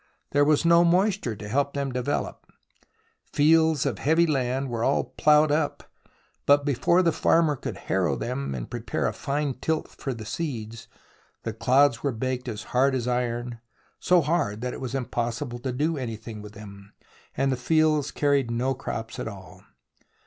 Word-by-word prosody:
There 145 Hz, 0 st, +4 dB
was 150 Hz, +2 st, +3 dB
no 170 Hz, 0 st, +6 dB
moisture 180 Hz, -, +2 dB
to 105 Hz, +1 st, -8 dB
help 140 Hz, +5 st, 0 dB
them 140 Hz, -1 st, -2 dB
to 125 Hz, -, -2 dB
develop. 145 Hz, +4 st, -3 dB, 0.8 s
Fields 160 Hz, -1 st, +4 dB
of -, -, -2 dB
heavy 160 Hz, +4 st, +3 dB
land 135 Hz, -3 st, 0 dB
were 115 Hz, -2 st, -3 dB
all 135 Hz, -, +2 dB
ploughed 150 Hz, 0 st, +3 dB
up, 150 Hz, 0 st, 0 dB, 0.6 s
but 145 Hz, 0 st, +5 dB
before 145 Hz, +6 st, +3 dB
the 170 Hz, -, +3 dB
farmer 160 Hz, -1 st, +3 dB
could -, -, -6 dB
harrow -, -, 0 dB
them 70 Hz, -1 st, -3 dB
and -, -, -5 dB
prepare -, -, -3 dB
a -, -, 0 dB
fine 140 Hz, 0 st, -2 dB
tilth 160 Hz, +2 st, -2 dB
for 135 Hz, -3 st, -5 dB
the 110 Hz, -2 st, -8 dB
seeds, 115 Hz, -4 st, -5 dB, 0.6 s
the 115 Hz, -, -3 dB
clods 130 Hz, +3 st, +3 dB
were 140 Hz, -, 0 dB
baked 130 Hz, +2 st, -3 dB
as 110 Hz, -2 st, -5 dB
hard 130 Hz, +2 st, +3 dB
as 125 Hz, -2 st, -2 dB
iron, 120 Hz, -1 st, -2 dB, 0.4 s
so 180 Hz, -1 st, +4 dB
hard 145 Hz, -9 st, -1 dB
that 125 Hz, 0 st, -3 dB
it -, -, -8 dB
was 130 Hz, 0 st, -4 dB
impossible 120 Hz, 0 st, -3 dB
to 130 Hz, +1 st, -3 dB
do 150 Hz, +5 st, -1 dB
anything 115 Hz, -3 st, -6 dB
with 105 Hz, 0 st, -11 dB
them, 100 Hz, -1 st, -12 dB, 0.4 s
and 135 Hz, 0 st, +2 dB
the -, -, +1 dB
fields 150 Hz, +3 st, +2 dB
carried 140 Hz, -4 st, +1 dB
no 125 Hz, +3 st, 0 dB
crops 115 Hz, -3 st, -6 dB
at -, -, -4 dB
all. 95 Hz, -6 st, -10 dB
130 Hz, 175 wpm, -26 LUFS, 115-150 Hz, 0.8 s, no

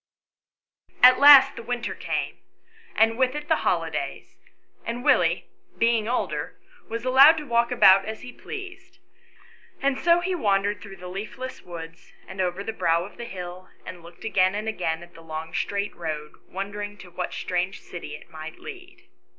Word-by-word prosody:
At 255 Hz, +1 st, +9 dB
last 280 Hz, -1 st, +9 dB
the -, -, -7 dB
winter 240 Hz, 0 st, -3 dB
came; -, -, -4 dB, 0.6 s
and 225 Hz, +2 st, +3 dB
with 260 Hz, +1 st, +2 dB
it 295 Hz, 0 st, -5 dB
the 320 Hz, -, +4 dB
holi -, -, 0 dB
days; -, -, -5 dB, 0.5 s
and 235 Hz, +1 st, -4 dB
Willie, 175 Hz, -, +3 dB, 0.3 s
being 230 Hz, -2 st, +2 dB
older, 245 Hz, -, -3 dB, 0.3 s
was 230 Hz, +2 st, -4 dB
allowed 270 Hz, +5 st, +7 dB
to 305 Hz, -, -4 dB
walk 235 Hz, -2 st, +2 dB
about 195 Hz, -5 st, +6 dB
as 220 Hz, 0 st, -6 dB
he 250 Hz, -, -8 dB
pleased, 385 Hz, -2 st, -9 dB, 0.8 s
and 275 Hz, -1 st, 0 dB
so 340 Hz, 0 st, +4 dB
he 370 Hz, +2 st, -2 dB
wandered 205 Hz, -, 0 dB
through 195 Hz, -2 st, -10 dB
the 180 Hz, -1 st, -10 dB
leafless 215 Hz, +8 st, -7 dB
woods, 165 Hz, -2 st, -10 dB
and 190 Hz, 0 st, -5 dB
over 180 Hz, +2 st, -2 dB
the 225 Hz, -, -4 dB
brow 170 Hz, -4 st, +1 dB
of 200 Hz, -, -13 dB
the 235 Hz, -, -6 dB
hill, 180 Hz, -3 st, -8 dB, 0.2 s
and 180 Hz, -2 st, -9 dB
looked 170 Hz, +4 st, -13 dB
again 190 Hz, -3 st, +2 dB
and 215 Hz, +1 st, -4 dB
again 170 Hz, -6 st, -2 dB
at 175 Hz, 0 st, -16 dB
the 165 Hz, -, -14 dB
long 160 Hz, 0 st, -7 dB
straight 200 Hz, 0 st, -2 dB
road, 155 Hz, -3 st, -5 dB
wondering 205 Hz, +2 st, -6 dB
to 180 Hz, -3 st, -13 dB
what 180 Hz, +1 st, -4 dB
strange 180 Hz, +2 st, -2 dB
city 170 Hz, -4 st, -8 dB
it -, -, -14 dB
might 160 Hz, 0 st, -9 dB
lead. 365 Hz, -4 st, -11 dB
205 Hz, 175 wpm, -25 LUFS, 180-255 Hz, 0.8 s, At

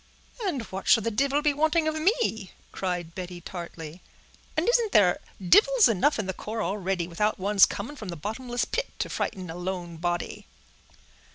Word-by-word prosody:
"And 280 Hz, -10 st, -1 dB
what 190 Hz, +1 st, -6 dB
should 225 Hz, -, +6 dB
the 230 Hz, -, -1 dB
divil 275 Hz, +6 st, +1 dB
be 295 Hz, -1 st, +3 dB
wanting 315 Hz, +2 st, +2 dB
of 315 Hz, -, +1 dB
me?" 315 Hz, -, 0 dB, 0.2 s
cried 175 Hz, -3 st, -3 dB
Betty, 180 Hz, -1 st, -6 dB
tartly. 170 Hz, -1 st, -8 dB, 0.6 s
"And 315 Hz, -, +1 dB
isn't 470 Hz, -3 st, +3 dB
there 180 Hz, -4 st, +5 dB, 0.2 s
divils 430 Hz, -, +6 dB
enough 230 Hz, +7 st, +2 dB
in 215 Hz, -, -2 dB
the 190 Hz, -, -3 dB
corps 220 Hz, +3 st, -4 dB
already, 190 Hz, -2 st, -1 dB
without 210 Hz, +5 st, 0 dB
one's 200 Hz, +1 st, +5 dB
coming 230 Hz, +9 st, -6 dB
from 215 Hz, -9 st, -8 dB
the 170 Hz, -, -4 dB
bottomless 240 Hz, -, -3 dB
pit -, -, -2 dB
to -, -, -2 dB
frighten 185 Hz, -2 st, -3 dB
a -, -, -7 dB
lone 175 Hz, -2 st, -5 dB
body?" 175 Hz, +1 st, -3 dB
205 Hz, 175 wpm, -27 LUFS, 180-290 Hz, 0.6 s, should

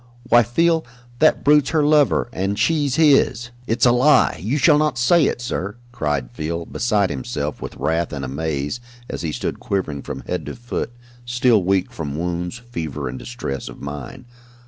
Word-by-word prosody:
Why, 120 Hz, -1 st, +5 dB
Field, 160 Hz, +8 st, +2 dB, 0.4 s
that 155 Hz, -, +4 dB
brute's 145 Hz, -1 st, +4 dB
her 155 Hz, -2 st, +2 dB
lover, 150 Hz, -1 st, +3 dB
and 95 Hz, +2 st, -1 dB
she's 145 Hz, +2 st, +1 dB
his 135 Hz, -6 st, +3 dB
" 125 Hz, -, -26 dB
"It's 115 Hz, +3 st, +2 dB
a 120 Hz, -, +6 dB
lie! 125 Hz, -, +4 dB
You 115 Hz, +10 st, -1 dB
shall 150 Hz, 0 st, +5 dB
not 150 Hz, -4 st, +1 dB
say 145 Hz, +6 st, +4 dB
it, -, -, -2 dB
sir!" 105 Hz, -4 st, -3 dB, 0.2 s
cried 75 Hz, -, -2 dB
Field, 80 Hz, +6 st, -5 dB
beside 105 Hz, -5 st, +1 dB
himself 65 Hz, -3 st, -4 dB
with -, -, -6 dB
wrath 80 Hz, +1 st, 0 dB
and 70 Hz, -2 st, -4 dB
amaze, 75 Hz, -, -3 dB, 0.3 s
as -, -, -5 dB
he 80 Hz, -3 st, -2 dB
stood -, -, -3 dB
quivering 80 Hz, -8 st, -2 dB
from -, -, -6 dB
head -, -, -4 dB
to -, -, -5 dB
foot, 120 Hz, 0 st, -4 dB, 0.3 s
still 120 Hz, -3 st, +2 dB
weak 95 Hz, 0 st, +1 dB
from 75 Hz, -3 st, -5 dB
wounds, 90 Hz, +4 st, -3 dB
fever 80 Hz, -, -5 dB
and 65 Hz, +1 st, -5 dB
distress 120 Hz, -, -5 dB
of -, -, -11 dB
mind. 70 Hz, -, -7 dB
110 Hz, 180 wpm, -21 LUFS, 80-130 Hz, 0.4 s, a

